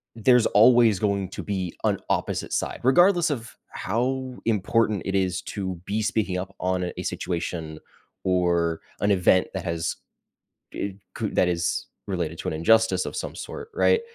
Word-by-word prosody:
there's 120 +1 +4
always 115 -2 +5
going 100 -3 0
to - - -6
be 95 -4 -3
an - - +2
opposite - - -1
side, - - -2
regardless 175 +6 +5
of 120 -5 -4
how 125 +4 -2
important 110 -1 +1
it 95 - -1
is 95 -1 0
to 95 -3 -4
be 105 +2 -1
speaking 105 -4 0
up 95 +1 -5
on 90 -1 -1
a - - -4
situation 85 -3 -4 0.4
or 85 -3 +1 0.2
an 100 - +2
event 95 -1 +4
that 95 - -4
has 85 -2 -2 0.8
it 100 -1 -4 0.2
cou 110 -2 -2
that 90 - +3
is 85 -1 -1 0.2
related 85 -4 -2
to - - -5
an - - -4
injustice 95 +3 +3
of - - -5
some - - -4
sort, 450 -1 -7
right? 460 +1 +3
95 Hz, 160 wpm, -25 LUFS, 90-115 Hz, 0.8 s, always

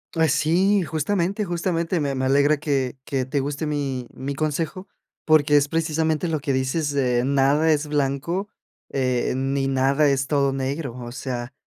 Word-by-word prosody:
Ay, 160 -1 +3
sí, 175 +7 +3
justamente, 180 +5 -1
justamente, 170 -1 -1
me 140 -2 -1
me 130 0 -1
alegra 145 +3 +3
que 135 -4 -1
que 135 -2 -1
te 135 +2 -1
guste 145 +3 -3
mi 135 -4 -2
mi 140 +2 -5
consejo, 160 +6 -3 0.4
porque 150 -2 +4
es 145 0 +4
precisamente 160 0 0
lo 155 -2 -1
que 140 0 -2
dices, 130 +4 0
de 125 -3 +1
nada 140 +4 +3
es 150 0 +1
blanco, 150 +7 -1 0.4
eh, 130 -2 0
ni 135 0 0
nada 135 +2 +2
es 135 -1 +1
todo 140 -1 +1
negro. 135 -1 -3
O 120 0 -7
sea, 125 -1 -5
145 Hz, 165 wpm, -23 LUFS, 135-160 Hz, 0.4 s, porque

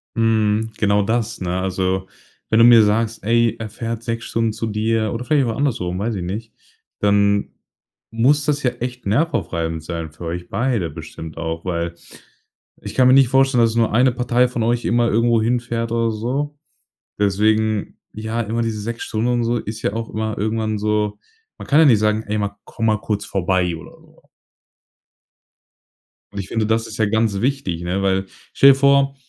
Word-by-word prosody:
Mhm. 110 -1 +1
Genau 100 -1 +2
das, 115 +1 -1
ne? 90 0 -2
Also, 95 0 -1 0.4
wenn 110 - +3
du 115 - +8
mir 120 -2 +8
sagst: 110 +1 0
„Ey, 115 +1 +2
er 110 -1 -6
fährt 115 +1 -5
6 115 0 -3
Stunden 115 -1 0
zu 115 - -4
dir“ 110 0 0
oder 120 +1 -4
vielleicht 140 -1 +2
auch 115 - -2
andersrum, 95 -11 -1
weiß 110 +2 -2
ich 95 - -4
nicht 105 +5 -5 0.5
dann 100 0 +3 0.6
muss 135 +6 +2
das 150 -1 0
ja 125 - +3
echt 125 -2 -5
nervaufreibend 85 - -1
sein, 80 -1 -5
für 80 +3 -10
euch 85 +1 -5
beide 115 - -1
bestimmt 80 +2 -9
auch, 80 +1 -4
weil 85 -1 -2 0.9
ich - - -7
kann 130 -1 +5
mir 130 - +6
nicht 135 -2 +6
vorstellen, 135 -1 +3
dass 115 - +3
es - - -6
nur 115 -1 +2
1 125 +3 +4
Partei 125 +1 +2
von 120 -1 -4
euch 120 +1 0
immer 120 0 +2
irgendwo 115 +1 +2
hinfährt 115 0 -1
oder 115 -1 +1
so. 135 +7 -3 0.6
Deswegen 110 +1 +1 0.2
ja, 110 +2 -3
immer 115 +1 -2
diese 110 -2 -2
6 115 +2 -5
Stunden 110 +2 -1
und 120 -1 +1
so 120 +1 0
ist 110 0 -6
ja - - 0
auch 115 0 -4
immer 110 0 -3
irgendwann 110 0 -1
so. 105 0 0 0.4
Man - - -9
kann 145 - +4
ja 160 - +7
nicht 120 -7 +5
sagen: 105 +1 +1
„Ey 105 +1 -2
ma 100 -1 -3
komm 115 - -3
mal 105 -1 +2
kurz 105 0 -2
vorbei!" 90 -2 0
oder 85 - -13
so. - - -23 2.1
Und 100 - -5
ich 95 - -5
finde, 110 +1 -1
das 110 +1 0
ist 110 - -8
ja 110 - +2
ganz 110 -2 0
wichtig, 125 -10 -1
ne, 90 +3 -1
weil; 95 0 +1 0.3
Stell 140 - +7
dir - - +4
vor, 140 0 +3
110 Hz, 190 wpm, -20 LUFS, 100-120 Hz, 2.1 s, du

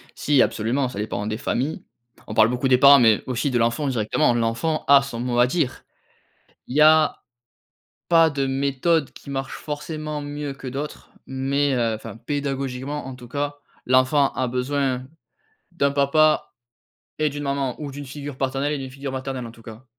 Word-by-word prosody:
Si, 145 -2 +3
absolument, 125 +5 0
ça 110 - -8
dépend 105 -1 -3
des 110 0 -3
familles. 135 +2 -2 0.4
On 110 - -6
parle 110 0 +5
beaucoup 125 +2 0
des 125 -1 +5
parents 140 0 +8
mais 110 -3 +4
aussi 130 +3 -1
de 125 - +1
l'enfant 120 +5 +1
directement. 120 +2 +1
L'enfant 115 +7 -1
a 140 -1 +7
son 120 -4 -6
mot 120 -1 -1
à 120 - +6
dire. 135 -1 -2 0.8
Il 130 - -6
y - - +5
a 155 0 +5 0.9
pas 165 -2 +5
de 140 -1 -1
méthode 140 +3 0
qui 140 - -12
marche 135 -1 -4
forcément 150 0 -5
mieux 145 0 -5
que 135 - -11
d'autres 140 +4 -6 0.2
mais 135 +1 0
heu, 115 -2 +1
enfin 110 - -8
pédagogiquement 135 +1 -3
en 130 - -7
tout 125 -1 -12
cas, 145 +2 -3 0.3
l'enfant 130 +2 +3
a 130 -1 -1
besoin 130 0 -1 0.7
d'un 140 -5 +1
papa 150 +2 +3 0.7
et 155 -1 +2
d'une 145 +1 -6
maman 140 -2 -2
ou 145 - -5
d'une 145 +1 -8
figure 140 0 -7
paternelle 135 +2 -1
et - - -2
d'une 130 -1 -7
figure 135 0 -6
maternelle, 130 -2 -4
en 115 - -8
tout 115 - -17
cas. 115 +3 -12
135 Hz, 180 wpm, -23 LUFS, 125-145 Hz, 0.9 s, parents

